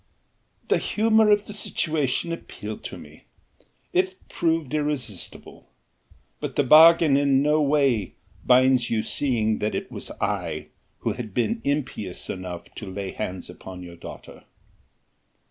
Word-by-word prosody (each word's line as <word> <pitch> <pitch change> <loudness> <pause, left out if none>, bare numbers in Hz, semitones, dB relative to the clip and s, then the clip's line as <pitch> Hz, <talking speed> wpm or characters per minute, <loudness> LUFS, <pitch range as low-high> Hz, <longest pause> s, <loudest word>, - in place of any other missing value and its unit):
"The - - +3
humour 220 0 +3
of 205 0 +4
the 210 - -8
situation 160 -6 -1
appealed 110 -9 -7
to - - -6
me - - -14 0.7
it 185 +1 +1
proved 160 -4 0
irresistible 145 - -4 0.7
but - - -5
the 145 - +3
bargain 160 +1 +7
in 140 -1 +3
no 150 +1 +3
way 140 -8 +2 0.3
binds 130 -1 +4
you 110 -2 0
seeing 110 -6 0
that 105 - -1
it - - -4
was - - -7
I - - -2 0.3
who - - 0
had 110 -6 -7
been 225 - 0
impious 135 -10 -2
enough 90 -2 -6
to 100 -4 -7
lay 95 0 -4
hands 90 0 -5
upon 90 0 -10
your 85 -1 -10
daughter." 85 - -11
135 Hz, 135 wpm, -25 LUFS, 105-160 Hz, 0.7 s, bargain